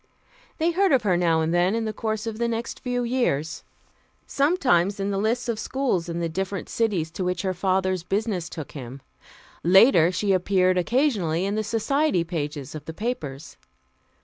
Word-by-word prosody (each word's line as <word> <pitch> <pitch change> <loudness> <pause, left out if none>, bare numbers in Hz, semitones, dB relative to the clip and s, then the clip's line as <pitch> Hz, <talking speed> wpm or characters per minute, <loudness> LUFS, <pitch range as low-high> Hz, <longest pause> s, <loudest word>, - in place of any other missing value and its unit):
They 330 +2 +1
heard 385 +2 +2
of 255 -4 +3
her 190 -4 +2
now 165 -2 +2
and 160 +1 0
then 180 +4 +2
in 230 -1 -1
the 215 - -3
course 220 +1 -3
of 225 -1 -5
the 235 - +1
next 230 0 -4
few 245 -1 -2
years 235 - -1 0.6
sometimes 250 - +2
in 195 +1 -1
the 195 - -1
lists 230 +4 0
of 230 -2 -2
schools 220 -9 -1
in 170 0 -3
the 170 - -1
different 190 +4 -4
cities 195 -9 0
to 185 - -4
which 180 0 -1
her 190 -1 0
father's 185 0 0
business 195 -1 -2
took 155 -4 -7
him; 135 -1 -9 0.6
later, 180 -1 +6
she 195 +2 0
appeared 185 0 +2
occasionally 190 - +1
in 200 - -1
the 215 +1 -1
society 230 - +1
pages 150 -5 -4
of 155 - -8
the 160 - -7
papers. 155 - -5
195 Hz, 180 wpm, -24 LUFS, 170-230 Hz, 0.6 s, later